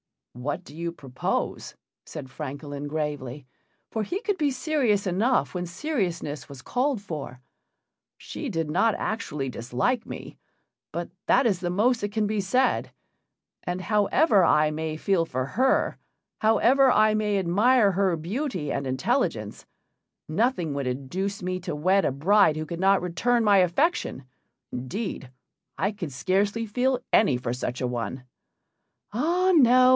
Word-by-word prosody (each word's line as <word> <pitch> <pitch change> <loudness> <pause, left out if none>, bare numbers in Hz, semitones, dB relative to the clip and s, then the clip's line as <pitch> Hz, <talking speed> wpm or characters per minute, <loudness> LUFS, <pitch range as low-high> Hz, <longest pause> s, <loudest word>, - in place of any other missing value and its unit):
"What 145 +9 -4
do 145 - -13
you 170 +1 -3
propose?" 135 -5 -3 0.3
said 130 - -8
Francolin, 145 0 -6
gravely, 145 -3 -4 0.5
for 220 - -1
he 355 - -3
could 410 -3 -1
be 300 -4 +2
serious 255 -6 +1
enough 215 +8 +1
when 180 -1 -3
seriousness 175 - -3
was 140 -3 -11
called 255 -2 0
for. 145 -9 -7 0.8
"She 295 - -6
did 165 -6 -2
not 220 +7 +3
actually 150 -11 -3
dislike 125 - -1
me, - - -8 0.6
but 170 0 -3 0.2
that 255 +2 +4
is 200 -6 +2
the 175 -1 -2
most 225 +7 +2
that 205 0 -3
can 215 -1 +1
be 215 0 -1
said; 250 +7 +1 0.7
and 180 +1 -3
however 205 - +3
I 155 -2 +4
may 155 0 -3
feel 180 -1 +1
for 130 -4 -2
her, 260 - +1 0.4
however 255 +5 +4
I 215 -2 +4
may 210 -1 +1
admire 205 +5 +4
her 190 -1 +1
beauty 180 - -3
and 140 -1 -2
intelligence, 130 0 -1 0.6
nothing 180 - 0
would 140 -2 -2
induce 180 +11 -3
me 185 0 -2
to 175 -4 -4
wed 185 +6 +2
a - - +2
bride 165 +4 +4
who 155 0 -3
could 170 +2 -6
not 195 0 +4
return 225 +8 +1
my 205 -2 +5
affection. 185 - +1 0.5
Indeed, 135 - -4 0.5
I 195 - +1
could 175 -9 -6
scarcely 200 - 0
feel 250 +4 0
any 175 - +5
for 125 -1 -3
such 125 0 -4
a - - +1
one." 125 +1 -4 0.9
"Ah 345 - +2
no! 255 -4 +6
185 Hz, 150 wpm, -26 LUFS, 150-225 Hz, 0.9 s, no